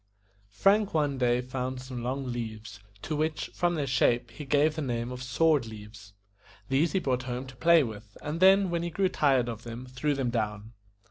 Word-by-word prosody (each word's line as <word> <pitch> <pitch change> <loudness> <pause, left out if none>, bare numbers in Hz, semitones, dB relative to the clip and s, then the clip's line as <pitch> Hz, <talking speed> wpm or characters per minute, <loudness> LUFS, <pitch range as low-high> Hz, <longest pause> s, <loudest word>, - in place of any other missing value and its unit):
FRANK 195 - +2
one 145 -3 +1
day 120 -1 +2
found 130 0 -4
some 130 -1 -7
long 130 +3 -3
leaves, 110 -5 -6 0.2
to 155 - -2
which, 155 +1 -2
from 175 0 +1
their 145 -3 -1
shape, 120 -2 +1
he 150 +5 -8
gave 145 +3 +3
the 160 - -3
name 120 -3 -2
of 125 0 -6
sword 140 0 +2
leaves. 105 -1 -11 0.6
These 145 +5 +2
he 190 - +2
brought 130 -7 0
home 125 +2 -3
to 130 0 -12
play 165 +4 +5
with, 105 -3 -8
and 150 +3 -3
then, 190 0 +5
when 170 -1 0
he 170 - -2
grew 190 +3 +1
tired 135 -8 +2
of 115 -2 -5
them, 120 +1 -8
threw 130 +3 -1
them 130 -3 -1
down. 105 -1 -3
130 Hz, 200 wpm, -28 LUFS, 120-155 Hz, 0.6 s, play